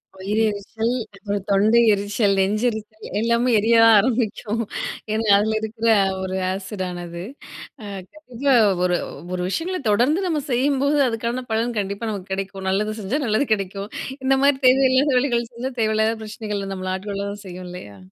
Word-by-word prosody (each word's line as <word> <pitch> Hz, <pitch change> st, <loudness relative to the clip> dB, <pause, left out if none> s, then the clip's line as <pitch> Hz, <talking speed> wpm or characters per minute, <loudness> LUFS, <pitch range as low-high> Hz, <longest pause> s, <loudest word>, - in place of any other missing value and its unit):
வயிறெரிச்சல், 210 Hz, +3 st, -1 dB, 0.2 s
அப்புறம் 200 Hz, -1 st, -4 dB
தொண்டையெரிச்சல், 205 Hz, 0 st, +3 dB
நெஞ்செரிச்சல் 215 Hz, +1 st, -2 dB
எல்லாமே 235 Hz, +2 st, +2 dB
எரியத்தான் 225 Hz, +1 st, +6 dB
ஆரம்பிக்கும். 225 Hz, -1 st, -1 dB, 0.5 s
ஏன்னா 220 Hz, 0 st, -1 dB
அதுல 220 Hz, +2 st, +1 dB
இருக்குற 220 Hz, +1 st, -1 dB, 0.3 s
ஒரு 190 Hz, 0 st, -3 dB, 0.2 s
ஆசிடானது. 180 Hz, -3 st, -5 dB, 0.6 s
அ -, -, -7 dB, 0.3 s
கண்டிப்பா 275 Hz, -3 st, -1 dB, 0.3 s
ஒரு 180 Hz, -1 st, +2 dB, 0.4 s
ஒரு 180 Hz, -, -2 dB
விஷயங்கள 360 Hz, -, -2 dB
தொடர்ந்து 255 Hz, -, +3 dB
நம்ம 315 Hz, -4 st, 0 dB
செய்யும்போது 280 Hz, +3 st, +2 dB
அதுக்கான 235 Hz, +2 st, -3 dB
பலன் 230 Hz, +1 st, 0 dB
கண்டிப்பா 200 Hz, +3 st, -3 dB
நமக்கு 195 Hz, -2 st, -7 dB
கெடைக்கும். 195 Hz, 0 st, -4 dB
நல்லது 210 Hz, +3 st, -1 dB
செஞ்சா 230 Hz, +10 st, -1 dB
நல்லது 220 Hz, +5 st, +1 dB
கெடைக்கும். 195 Hz, 0 st, -4 dB, 0.4 s
இந்த 270 Hz, 0 st, +4 dB
மாரி 280 Hz, -1 st, +4 dB
தேவையில்லாத 260 Hz, +2 st, +4 dB
வேலைகள் 240 Hz, -3 st, 0 dB
செஞ்சா 250 Hz, +3 st, -4 dB
தேவையில்லாத 220 Hz, +1 st, +2 dB
ப்ரச்சனைகள்ல 210 Hz, -2 st, -5 dB
நம்மள 185 Hz, 0 st, -3 dB
ஆட்கொள்ள 200 Hz, +1 st, -4 dB
தான் 205 Hz, +1 st, -9 dB
செய்யும் 180 Hz, 0 st, -8 dB
இல்லையா? 105 Hz, -, -10 dB
220 Hz, 135 wpm, -22 LUFS, 195-240 Hz, 0.6 s, எரியத்தான்